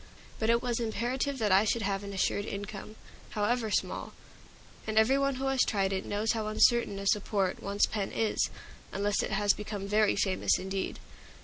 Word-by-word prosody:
But 220 Hz, -, 0 dB
it 235 Hz, 0 st, +3 dB
was 245 Hz, -2 st, -1 dB
imperative 245 Hz, +5 st, -1 dB
that 215 Hz, -5 st, 0 dB
I 190 Hz, +2 st, +6 dB
should 220 Hz, +1 st, 0 dB
have 200 Hz, 0 st, -1 dB
an 200 Hz, -, -6 dB
assured 200 Hz, +1 st, 0 dB
income, 205 Hz, +1 st, -6 dB, 0.3 s
however 220 Hz, +2 st, 0 dB
small; -, -, -2 dB, 0.7 s
and 220 Hz, 0 st, -2 dB
every 245 Hz, +5 st, +5 dB
one 275 Hz, -1 st, +1 dB
who 265 Hz, +1 st, -3 dB
has 270 Hz, -1 st, +2 dB
tried 195 Hz, -2 st, +1 dB
it 190 Hz, -, -3 dB
knows 210 Hz, +2 st, 0 dB
how 220 Hz, -2 st, -2 dB
uncertain 215 Hz, -1 st, +3 dB
a 200 Hz, -, -5 dB
support 195 Hz, -2 st, 0 dB
one's 200 Hz, +1 st, +2 dB
pen 205 Hz, -3 st, -3 dB
is, 220 Hz, -1 st, 0 dB, 0.4 s
unless 205 Hz, +1 st, 0 dB
it -, -, -3 dB
has 205 Hz, 0 st, +3 dB
become 205 Hz, -1 st, -5 dB
very 210 Hz, +1 st, +3 dB
famous 190 Hz, -2 st, +2 dB
indeed. 190 Hz, +1 st, -3 dB
210 Hz, 185 wpm, -30 LUFS, 200-230 Hz, 0.7 s, I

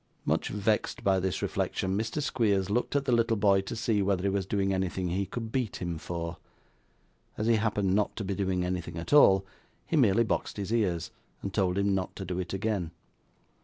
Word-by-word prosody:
Much -, -, +1 dB
vexed 105 Hz, +1 st, -1 dB
by 95 Hz, -1 st, +3 dB
this 95 Hz, 0 st, -2 dB
reflection, 95 Hz, 0 st, -1 dB
Mr. 115 Hz, +8 st, -2 dB
Squeers 100 Hz, -8 st, +1 dB
looked 120 Hz, +5 st, 0 dB
at 140 Hz, -1 st, +1 dB
the 130 Hz, -, +1 dB
little 115 Hz, -1 st, +3 dB
boy 100 Hz, -1 st, +4 dB
to 95 Hz, -, -6 dB
see 110 Hz, -2 st, +1 dB
whether 95 Hz, -2 st, +1 dB
he 100 Hz, -, +2 dB
was 95 Hz, -1 st, -1 dB
doing 95 Hz, -1 st, 0 dB
anything 95 Hz, -1 st, -1 dB
he 95 Hz, +3 st, -1 dB
could 115 Hz, -2 st, -5 dB
beat 125 Hz, -5 st, -1 dB
him 85 Hz, -3 st, -4 dB
for. 85 Hz, 0 st, -5 dB, 1.0 s
As 105 Hz, -, -1 dB
he 115 Hz, 0 st, +4 dB
happened 105 Hz, -3 st, +1 dB
not 105 Hz, +1 st, +1 dB
to 110 Hz, -, -4 dB
be 100 Hz, 0 st, -2 dB
doing 95 Hz, -2 st, 0 dB
anything 90 Hz, -2 st, -3 dB
at 85 Hz, +11 st, -4 dB
all, 95 Hz, -10 st, +7 dB, 0.4 s
he -, -, -2 dB
merely 115 Hz, -6 st, +4 dB
boxed 110 Hz, -, -2 dB
his 100 Hz, +2 st, -3 dB
ears, 90 Hz, -7 st, 0 dB, 0.3 s
and 100 Hz, -, -4 dB
told 95 Hz, -3 st, +1 dB
him 100 Hz, 0 st, +2 dB
not 95 Hz, -1 st, -2 dB
to 95 Hz, -, -6 dB
do 90 Hz, 0 st, -3 dB
it 90 Hz, -1 st, -4 dB
again. 95 Hz, -3 st, -1 dB
100 Hz, 205 wpm, -29 LUFS, 95-110 Hz, 1.0 s, all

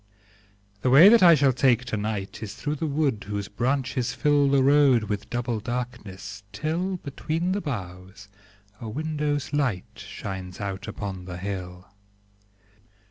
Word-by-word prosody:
The 130 Hz, -, +1 dB
way 150 Hz, +10 st, +9 dB
that 230 Hz, -1 st, +6 dB
I 170 Hz, -2 st, +8 dB
shall 140 Hz, -2 st, +3 dB
take 125 Hz, -1 st, +3 dB
to 120 Hz, -, -3 dB
night 105 Hz, -2 st, -4 dB
Is 110 Hz, -1 st, -6 dB
through 145 Hz, +4 st, -3 dB
the 160 Hz, -, -2 dB
wood 140 Hz, -8 st, 0 dB
whose 100 Hz, -1 st, -3 dB
branches 130 Hz, +2 st, -1 dB
fill 145 Hz, -2 st, +3 dB
The 135 Hz, -1 st, +3 dB
road 140 Hz, -4 st, +5 dB
with 105 Hz, -1 st, -4 dB
double 120 Hz, -2 st, -2 dB
darkness, 115 Hz, -4 st, -6 dB
till, 165 Hz, -, -2 dB
Between 160 Hz, +3 st, -3 dB
the 200 Hz, +2 st, -1 dB
boughs, 95 Hz, -, -7 dB, 0.5 s
a 115 Hz, -, -6 dB
window's 150 Hz, +1 st, -2 dB
light 130 Hz, -11 st, 0 dB
Shines 95 Hz, -2 st, -7 dB
out 100 Hz, +2 st, -5 dB
upon 100 Hz, -4 st, -6 dB
the 90 Hz, -1 st, -7 dB
hill. 90 Hz, -1 st, -6 dB
120 Hz, 145 wpm, -25 LUFS, 100-145 Hz, 0.5 s, way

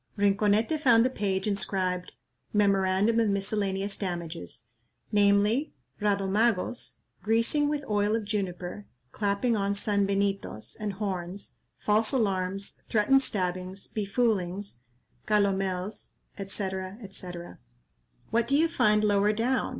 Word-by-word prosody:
'" -, -, -34 dB
Rinconete 205 Hz, +7 st, +2 dB
found 240 Hz, -5 st, +5 dB
the 255 Hz, -, +1 dB
page 195 Hz, -5 st, -1 dB
inscribed 185 Hz, -3 st, -1 dB, 0.4 s
"Memorandum 200 Hz, +2 st, +3 dB
of 225 Hz, -2 st, +3 dB
miscellaneous 200 Hz, 0 st, -1 dB
damages," 170 Hz, -, -5 dB, 0.5 s
namely, 205 Hz, +6 st, +3 dB, 0.3 s
Radomagos, 205 Hz, +2 st, +1 dB, 0.3 s
greasing 230 Hz, +8 st, +2 dB
with 295 Hz, -1 st, -2 dB
oil 210 Hz, 0 st, +2 dB
of 225 Hz, -2 st, -2 dB
juniper, 195 Hz, -1 st, -4 dB, 0.2 s
clapping 205 Hz, +3 st, 0 dB
on 200 Hz, -1 st, 0 dB
sanbenitos 200 Hz, -, 0 dB
and 210 Hz, -2 st, -2 dB
horns, 190 Hz, -1 st, -4 dB, 0.2 s
false 215 Hz, +1 st, +1 dB
alarms, 195 Hz, -4 st, -1 dB
threatened 235 Hz, +5 st, +4 dB
stabbings, 185 Hz, -3 st, -2 dB
befoolings, 200 Hz, -, -1 dB, 0.5 s
calomels, 195 Hz, -1 st, 0 dB, 0.2 s
&c. 195 Hz, 0 st, -3 dB, 0.4 s
&c. 185 Hz, -2 st, -4 dB, 1.0 s
"What 230 Hz, +1 st, +2 dB
do 280 Hz, -, +3 dB
you 325 Hz, +2 st, +4 dB
find 210 Hz, -9 st, +3 dB
lower 205 Hz, 0 st, +3 dB
down?" 245 Hz, +4 st, 0 dB
205 Hz, 110 wpm, -28 LUFS, 195-220 Hz, 1.0 s, found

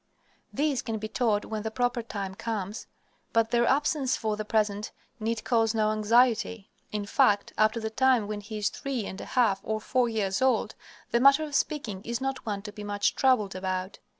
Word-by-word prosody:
These 290 Hz, -2 st, 0 dB
can 225 Hz, -2 st, -3 dB
be 215 Hz, 0 st, -4 dB
taught 215 Hz, -3 st, 0 dB
when 220 Hz, -1 st, -4 dB
the 220 Hz, -, -3 dB
proper 245 Hz, +1 st, 0 dB
time 200 Hz, -4 st, -5 dB
comes, 210 Hz, 0 st, -4 dB, 0.5 s
but 230 Hz, 0 st, +2 dB
their 235 Hz, 0 st, +3 dB
absence 285 Hz, -1 st, +1 dB
for 215 Hz, -2 st, -1 dB
the 215 Hz, -, -4 dB
present 210 Hz, -1 st, 0 dB, 0.3 s
need 225 Hz, +1 st, -2 dB
cause 225 Hz, -2 st, +2 dB
no 215 Hz, -1 st, +2 dB
anxiety. 225 Hz, -1 st, +2 dB, 0.2 s
In 210 Hz, -1 st, -3 dB
fact, 205 Hz, -3 st, +2 dB
up 215 Hz, 0 st, +3 dB
to 230 Hz, -, -3 dB
the 220 Hz, -1 st, -4 dB
time 255 Hz, -3 st, +3 dB
when 210 Hz, -1 st, -4 dB
he 215 Hz, +1 st, -7 dB
is 210 Hz, -1 st, +1 dB
three 265 Hz, -6 st, -4 dB
and 190 Hz, -, -6 dB
a -, -, -7 dB
half 225 Hz, -7 st, +2 dB
or 215 Hz, +1 st, -2 dB
four 245 Hz, +2 st, +1 dB
years 200 Hz, -3 st, -1 dB
old, 260 Hz, 0 st, +2 dB, 0.4 s
the 235 Hz, -, +3 dB
matter 275 Hz, +4 st, +6 dB
of 300 Hz, -2 st, -6 dB
speaking 255 Hz, -11 st, -1 dB
is 235 Hz, 0 st, -3 dB
not 270 Hz, -2 st, -4 dB
one 200 Hz, -2 st, -3 dB
to 210 Hz, -, -7 dB
be 210 Hz, -, -9 dB
much 205 Hz, -1 st, 0 dB
troubled 255 Hz, -7 st, +2 dB
about. 185 Hz, 0 st, -3 dB
220 Hz, 205 wpm, -28 LUFS, 205-245 Hz, 0.5 s, matter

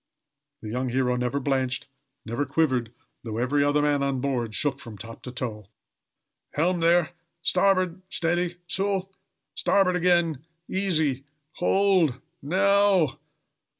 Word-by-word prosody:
The 105 Hz, -, -5 dB
young 125 Hz, +2 st, -1 dB
hero 125 Hz, 0 st, +1 dB
never 125 Hz, +3 st, -1 dB
blanched, 130 Hz, -2 st, -1 dB, 0.4 s
never 115 Hz, +6 st, -1 dB
quivered, 130 Hz, -5 st, 0 dB, 0.3 s
though 110 Hz, -2 st, -5 dB
every 135 Hz, +4 st, +2 dB
other 145 Hz, +1 st, +2 dB
man 145 Hz, -1 st, +2 dB
on 140 Hz, -1 st, 0 dB
board 125 Hz, -5 st, -2 dB
shook 140 Hz, +1 st, 0 dB
from 115 Hz, -5 st, -10 dB
top 115 Hz, +4 st, -10 dB
to 125 Hz, -, -7 dB
toe. 110 Hz, -5 st, -5 dB, 0.9 s
"Helm, 175 Hz, +4 st, +1 dB
there! 170 Hz, 0 st, +3 dB, 0.3 s
starboard! 185 Hz, -1 st, +2 dB
steady! 175 Hz, 0 st, 0 dB
so! 195 Hz, +1 st, -1 dB, 0.4 s
Starboard 195 Hz, -2 st, +2 dB
again! 170 Hz, -5 st, +2 dB, 0.2 s
Easy! 160 Hz, -9 st, 0 dB, 0.3 s
hold! 180 Hz, -8 st, +2 dB, 0.2 s
Now! 195 Hz, 0 st, +3 dB
145 Hz, 120 wpm, -26 LUFS, 125-180 Hz, 0.9 s, there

